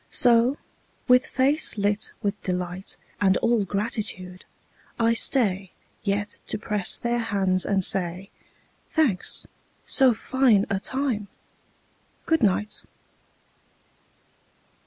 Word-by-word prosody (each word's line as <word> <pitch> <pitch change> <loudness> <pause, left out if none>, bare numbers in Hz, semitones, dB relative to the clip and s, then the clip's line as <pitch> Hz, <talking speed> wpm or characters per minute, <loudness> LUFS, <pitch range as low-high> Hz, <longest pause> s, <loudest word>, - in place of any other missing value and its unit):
So, 240 +2 +3 0.5
with 250 0 +4
face 280 0 +3
lit 205 +1 -1
with 200 0 -2
delight 180 +1 -4 0.2
And 190 -2 +3
all 230 -2 +1
gratitude, 195 -3 -3 0.5
I 230 0 +3
stay 200 -6 +2 0.3
Yet 205 0 -3
to - - -3
press 210 -3 -1
their 240 0 -1
hands 195 -5 0
and 195 -2 +2
say, 185 +1 0 0.6
"Thanks. 260 - 0 0.4
So 260 -4 +4
fine 245 -4 +2
a 195 - 0
time! 255 -3 -2 1.0
Good 325 0 +1
night. 210 0 0
210 Hz, 100 wpm, -24 LUFS, 190-240 Hz, 1.0 s, with